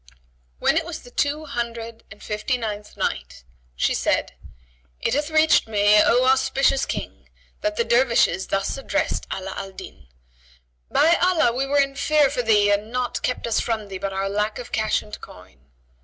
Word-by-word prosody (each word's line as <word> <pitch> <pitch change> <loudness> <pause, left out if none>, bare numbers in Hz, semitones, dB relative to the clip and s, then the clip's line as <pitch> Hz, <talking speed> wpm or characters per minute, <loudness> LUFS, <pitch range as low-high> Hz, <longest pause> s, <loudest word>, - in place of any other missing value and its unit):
When 315 - +2
it 330 - +1
was 335 -1 -7
the 245 - -14
Two 295 +4 -1
Hundred 230 -3 -5
and 200 - -13
and 210 -2 -3
Night, - - -3 0.3
She - - +1
said, - - 0 0.7
It - - -1
hath 295 +3 0
reached 315 -5 +4
me, 210 -1 +4
O 245 +4 +3
auspicious 265 +1 +2
King, - - -6 0.3
that 315 0 -1
the 470 - +1
Dervishes 235 - +2
thus 195 +5 -1
addressed 300 +3 -2
Ala 190 0 -4
al 195 -1 -6
Din, - - -12 0.8
"By 335 +2 +4
Allah, 345 -8 +3
we 265 +3 -1
were 285 +1 +1
in 275 0 +2
fear 295 -1 +3
for 265 - -1
thee 210 -3 +3
and 205 +2 -1
naught 250 -1 -2
kept 250 - -2
us 230 -1 +1
from 220 -3 -3
thee 190 -1 -6
but 195 - -3
our 195 0 -2
lack 210 +2 -1
of 245 - -8
cash 215 -1 0
and 210 - -10
coin." 90 -7 -15
235 Hz, 175 wpm, -23 LUFS, 205-275 Hz, 0.8 s, reached